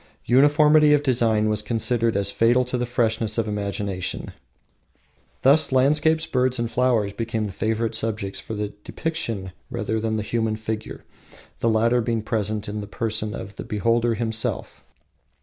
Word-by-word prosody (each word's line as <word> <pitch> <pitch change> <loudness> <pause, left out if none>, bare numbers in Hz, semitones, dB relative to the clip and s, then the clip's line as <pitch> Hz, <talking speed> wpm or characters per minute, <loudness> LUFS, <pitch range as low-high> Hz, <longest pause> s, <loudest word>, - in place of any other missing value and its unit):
Uniformity 150 +3 +5
of 145 0 +3
design 115 -5 +2
was 105 -1 0
considered 115 0 0
fatal 120 +5 +3
to 125 - -4
the 125 0 -1
freshness 110 -2 0
of 115 -1 0
imagination. 100 -2 -3 1.1
Thus, 140 +3 +5
landscapes, 150 +5 +3
birds, 130 -2 0
and 115 -1 -2
flowers 120 -5 +1
became 115 0 -2
the 100 - -5
favorite 110 +3 -1
subjects 110 -3 -2
for 110 - -6
depiction 105 - -4 0.2
rather 110 - -2
than 110 0 -1
the 105 - -2
human 110 -1 -1
figure, 110 0 -5 0.6
the 115 - +1
latter 115 +2 +2
being 115 -1 -1
present 110 -1 -2
in 105 +1 -4
the 100 - -7
person 110 0 -3
of 100 -2 -8
the - - -5
beholder 115 +2 +1
himself. 110 -1 -3
115 Hz, 150 wpm, -23 LUFS, 110-125 Hz, 1.1 s, Uniformity